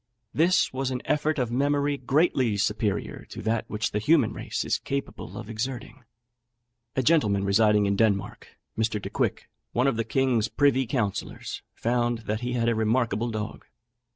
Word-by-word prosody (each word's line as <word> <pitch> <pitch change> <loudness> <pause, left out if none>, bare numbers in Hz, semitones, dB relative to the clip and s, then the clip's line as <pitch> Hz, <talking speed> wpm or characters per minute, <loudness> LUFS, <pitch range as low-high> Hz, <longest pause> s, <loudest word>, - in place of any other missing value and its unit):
This 170 0 +3
was 130 0 -1
an 125 -1 -3
effort 150 +1 +1
of 125 -3 -1
memory 145 +2 +1
greatly 130 -4 +2
superior 105 0 -1
to - - -8
that 110 +1 0
which 105 +1 -2
the 105 - 0
human 150 +8 +3
race - - -3
is - - 0
capable 140 0 -5
of - - -7
exerting." 120 +1 -5 0.9
A 130 - +1
gentleman 110 -10 +3
residing 105 +1 +4
in 100 0 +1
Denmark, 100 -2 0 0.3
Mr. 110 -1 0
Decouick, - - -2 0.3
one 125 - +2
of 135 -5 +2
the 115 - +1
king's 120 -1 +1
privy 135 -3 +2
councillors, 110 -6 -3
found 120 0 0
that 110 +2 -2
he 125 0 -2
had 115 -1 0
a 120 - +3
remarkable 115 0 +1
dog. 110 -1 -5
120 Hz, 160 wpm, -26 LUFS, 110-135 Hz, 0.9 s, residing